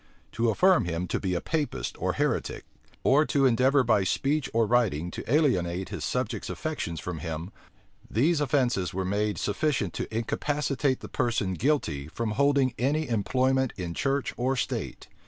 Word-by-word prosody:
To 115 0 +1
affirm 180 - +4
him 85 +1 -2
to - - 0
be 95 -2 -1
a 85 - -1
Papist 145 - -2
or - - +1
heretic, - - -1 0.4
or 145 +3 +5
to 140 -1 +2
endeavor 130 +2 +4
by 110 -4 +3
speech 140 +9 0
or 115 0 +2
writing 105 -9 +1
to - - -6
alienate 95 - +1
his - - -5
subjects' 120 -4 -2
affections 145 - -4
from 85 0 -5
him; 80 +4 -5 0.6
these 150 - +2
offences 125 - +1
were 95 0 -1
made 105 +2 0
sufficient 105 - 0
to - - -4
incapacitate 140 +4 -1
the - - -7
person 110 -6 0
guilty 90 - 0
from 110 +7 -3
holding 140 +2 +2
any 145 +4 0
employment 130 +4 +1
in 85 -2 -4
church 140 +7 -1
or 130 +2 +1
state. 125 - -3
120 Hz, 160 wpm, -27 LUFS, 95-140 Hz, 0.6 s, or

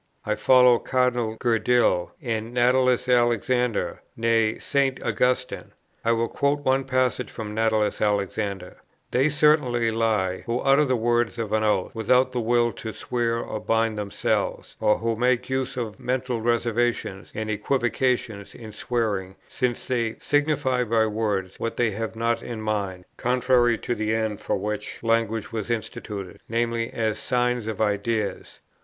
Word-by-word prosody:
I - - +1
follow 125 -2 +5
Cardinal 125 -3 0
Gerdil, 120 -6 +2
and 115 -1 -3
Natalis 125 0 +3
Alexander, 120 -1 +1 0.2
nay, 115 -1 +2
St. 140 -2 0
Augustine. 125 0 -1 0.3
I 115 - +2
will 115 0 +1
quote 140 +3 0
one 135 -1 +1
passage 130 -1 0
from 105 -2 -6
Natalis 110 -1 +1
Alexander: 100 -2 -1 0.3
"They 135 +4 +3
certainly 145 -6 +3
lie, 110 -5 0
who 115 +1 0
utter 140 +2 +4
the 130 -2 +1
words 120 0 +1
of 110 -2 -3
an 110 0 +2
oath, 105 -4 +1
without 125 +3 +2
the 125 - -2
will 120 0 +2
to 110 -1 -7
swear 115 +2 -1
or 115 -2 -4
bind 115 0 +1
themselves: 105 -1 -2
or 105 - +3
who 115 0 -1
make 125 +2 +1
use 130 0 -2
of 110 -5 -4
mental 125 -2 -2
reservations 120 -3 -1
and 110 0 -3
equivocations 120 -2 -1
in 110 -2 -9
swearing, 105 -4 -2
since 125 -2 -2
they 115 -3 -1
signify 145 -4 +1
by 115 -1 +2
words 105 -4 -2
what 115 - -3
they 120 -2 +2
have 110 +2 -4
not 115 +1 0
in 115 -2 -6
mind, 100 -4 -3
contrary 125 -1 +2
to 120 - -3
the 110 -1 -1
end 110 -2 -2
for - - -1
which 105 +2 -4
language 115 -1 0
was 110 -1 -4
instituted, 110 -4 -5
viz. 115 0 0
as 110 -2 -1
signs 125 -2 0
of 110 -3 -4
ideas. 105 0 -1
115 Hz, 150 wpm, -24 LUFS, 110-125 Hz, 0.3 s, follow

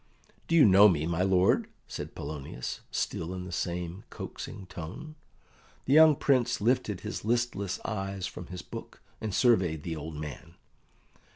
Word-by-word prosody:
"Do 165 - +2
you 160 - +8
know 100 +1 +8
me, 80 -4 0
my 85 +1 0
lord?" 95 -1 +3 0.2
said - - -6
Polonius, 70 -4 -5
still 85 +3 -2
in 90 0 -5
the 90 - -8
same 90 +2 -3
coaxing 95 - -7
tone. 90 - -8 0.7
The 135 - +2
young 155 0 +8
Prince 130 -3 +2
lifted 110 -3 +1
his 105 - -5
listless 110 -4 0
eyes 95 -3 -3
from 90 - -7
his 90 0 -7
book - - -9 0.2
and 110 - -2
surveyed 90 - +3
the 85 -2 -3
old 80 +1 -6
man. 75 +3 -8
95 Hz, 155 wpm, -29 LUFS, 85-110 Hz, 0.7 s, you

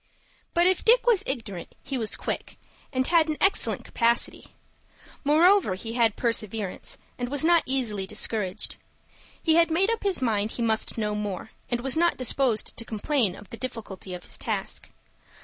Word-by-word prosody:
But 345 +1 +4
if 370 0 +3
Dick - - +5
was 465 -6 +4
ignorant, 225 -9 -5
he 275 - -4
was 225 -4 0
quick, - - -5 0.3
and 260 -1 0
had 330 0 +4
an 305 - -1
excellent 390 +1 +2
capacity. 235 0 0 0.7
Moreover 320 - +4
he 225 +4 -6
had 230 -3 +2
perseverance, 220 -4 -2 0.2
and 245 0 -2
was 285 +2 +1
not 340 0 +5
easily 225 -7 -1
discouraged. 195 -2 -1 0.7
He 320 - +3
had 335 0 +5
made 370 +7 +2
up 460 - -2
his 395 -3 +1
mind 220 -4 0
he 235 - -2
must 220 0 0
know 210 -1 -1
more, 210 0 -4 0.2
and 240 -1 -1
was 265 0 0
not 340 +1 +2
disposed 255 -3 +1
to 230 - -2
complain 225 -2 0
of 205 - -14
the 230 - -7
difficulty 210 -6 -6
of 180 - -9
his - - -7
task. - - -3
240 Hz, 170 wpm, -26 LUFS, 215-320 Hz, 0.7 s, Dick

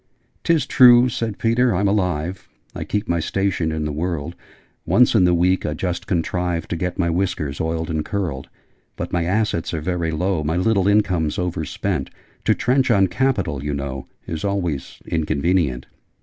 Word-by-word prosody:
"Tis 160 -5 +2
true, 125 -2 +7
'said 115 -4 -3
Peter,' 115 0 +2
I'm 100 +3 +1
alive: 90 -3 -1 0.2
I - - -5
keep 105 +1 -2
my 85 -1 +1
station 90 -2 -1
in 80 -1 -2
the 75 - -2
world: 85 +1 -3 0.5
Once 125 0 +4
in 100 -6 +5
the 90 - +4
week 90 +2 +2
I 75 - -2
just 90 +2 -3
contrive 90 -1 -1
To - - -1
get 90 +1 -3
my 85 -2 +1
whiskers 85 -5 -2
oiled 80 0 -2
and 80 -1 -1
curled. 85 -10 -3 0.5
But - - -5
my 85 -1 +1
assets 95 -3 0
are - - -2
very 85 +1 -2
low: 85 +1 -1
My 80 +3 -1
little 95 0 +2
income's 95 -7 +2
overspent: 85 -2 -2 0.4
To - - +4
trench 130 +2 +1
on 100 -5 +4
capital, 95 - 0
you 75 -1 -2
know, 70 -1 -5 0.2
Is 80 -1 -5
always 90 -8 -2
inconvenient!' 80 -3 0
90 Hz, 170 wpm, -21 LUFS, 80-100 Hz, 0.5 s, true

